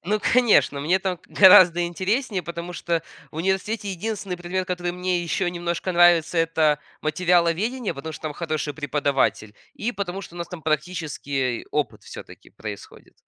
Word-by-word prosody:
Ну, 210 +4 0
конечно, 230 - +4
мне 175 +6 +2
там 190 -2 -2
г - - -33 0.2
гораздо 175 -2 +8
интереснее, 190 +4 -1
потому 170 +1 -6
что 170 -2 -2 0.3
в - - -13
университете 195 +5 -1
единственный 195 0 -4
предмет, 180 +1 -3
который 180 -1 -2
мне 180 -1 -1
ещё 175 +2 -1
немножко 175 +1 -3
нравится, 175 -1 +4
это 160 -2 +2 0.2
материаловедение. 180 +8 +1
Потому 150 +4 -7
что 150 - -10
там 155 -1 -3
хороший 155 -2 -3
преподаватель, 140 -7 0 0.3
и 235 +3 -1
потому 195 -2 -4
что 175 - -12
у - - -9
нас 170 -1 -5
там 175 -2 -9
практический 150 -5 -2
опыт 150 -2 -2
всё-таки - - -12
происходит. - - -10
175 Hz, 160 wpm, -23 LUFS, 160-185 Hz, 0.3 s, гораздо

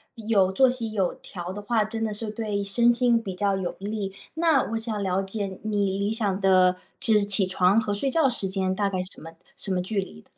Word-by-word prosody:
有 210 -4 +2
作 255 +7 +4
息 230 -4 -3
有 190 -4 0
调 180 -1 -8
的 205 - -6
话， 220 +1 +1
真 225 +1 -3
的 215 - -3
是 215 +1 -5
对 210 -3 -3
身 235 +4 +3
心 235 -1 +2
比 190 -4 -6
较 200 0 0
有 180 -2 -3
利。 200 -1 -4 0.2
那 320 -4 +3
我 225 - -1
想 220 -3 -3
了 190 0 0
解 195 -1 -4
你 200 -2 0
理 200 +1 0
想 210 -4 -1
的 185 -2 +4 0.2
指 210 -3 +4
起 200 -1 +4
床 185 +4 +3
和 205 -2 -2
睡 270 +7 -1
觉 285 -1 +3
时 220 -5 0
间 190 0 -1
大 200 +1 0
概 185 -2 -2
什 185 - -7
么 165 +1 -10 0.3
什 195 - -4
么 180 - 0
距 195 +2 -2
离？ 80 - -7
205 Hz, 245 characters per minute, -25 LUFS, 190-225 Hz, 0.3 s, 作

